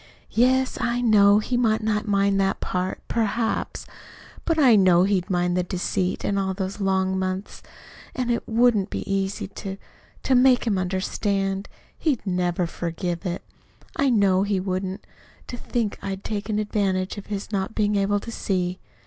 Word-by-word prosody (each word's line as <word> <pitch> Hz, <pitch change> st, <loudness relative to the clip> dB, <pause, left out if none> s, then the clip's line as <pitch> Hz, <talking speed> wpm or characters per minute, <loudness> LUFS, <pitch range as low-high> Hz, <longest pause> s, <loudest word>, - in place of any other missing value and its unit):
"Yes, 260 Hz, +2 st, +2 dB
I 240 Hz, 0 st, 0 dB
know. 205 Hz, -4 st, +5 dB
He 245 Hz, +4 st, 0 dB
might 220 Hz, -3 st, +2 dB
not 215 Hz, 0 st, 0 dB
mind 200 Hz, -1 st, +2 dB
that 195 Hz, 0 st, 0 dB
part, 185 Hz, +1 st, -3 dB
PERHAPS; 225 Hz, 0 st, -1 dB, 0.6 s
but 330 Hz, -, +1 dB
I 260 Hz, -7 st, +6 dB
know 185 Hz, -3 st, +5 dB
he'd 195 Hz, -1 st, 0 dB
mind 175 Hz, -1 st, +1 dB
the 180 Hz, -, +2 dB
deceit 180 Hz, +1 st, -2 dB
all 195 Hz, -1 st, 0 dB
these 195 Hz, +1 st, -4 dB
long 190 Hz, -1 st, +1 dB
months, 185 Hz, +1 st, -4 dB, 0.5 s
and 250 Hz, -2 st, -1 dB
it 235 Hz, -, -2 dB
wouldn't 225 Hz, -3 st, +3 dB
be -, -, -5 dB
easy 195 Hz, 0 st, -1 dB
to 195 Hz, 0 st, -7 dB, 0.5 s
to 265 Hz, -, +1 dB
make 250 Hz, -1 st, +5 dB
him 205 Hz, -5 st, +1 dB
understand. 195 Hz, +1 st, -1 dB, 0.3 s
He'd 285 Hz, -10 st, 0 dB
never 180 Hz, -1 st, 0 dB
forgive 170 Hz, +2 st, -4 dB
it 175 Hz, 0 st, -4 dB, 0.5 s
I 280 Hz, -, +2 dB
know 200 Hz, -5 st, +3 dB
he 200 Hz, -1 st, 0 dB
wouldn't 185 Hz, 0 st, -3 dB, 0.4 s
to -, -, -7 dB
think 235 Hz, -3 st, -3 dB
I'd 195 Hz, 0 st, -5 dB
taken 210 Hz, 0 st, -3 dB
advantage 200 Hz, -2 st, -1 dB
of 200 Hz, -, -12 dB
his 205 Hz, 0 st, -5 dB
not 195 Hz, +1 st, -2 dB
being 210 Hz, -1 st, +1 dB
able 200 Hz, +1 st, +2 dB
to 230 Hz, -, -7 dB
see." 185 Hz, -4 st, -2 dB
200 Hz, 160 wpm, -24 LUFS, 185-220 Hz, 0.6 s, I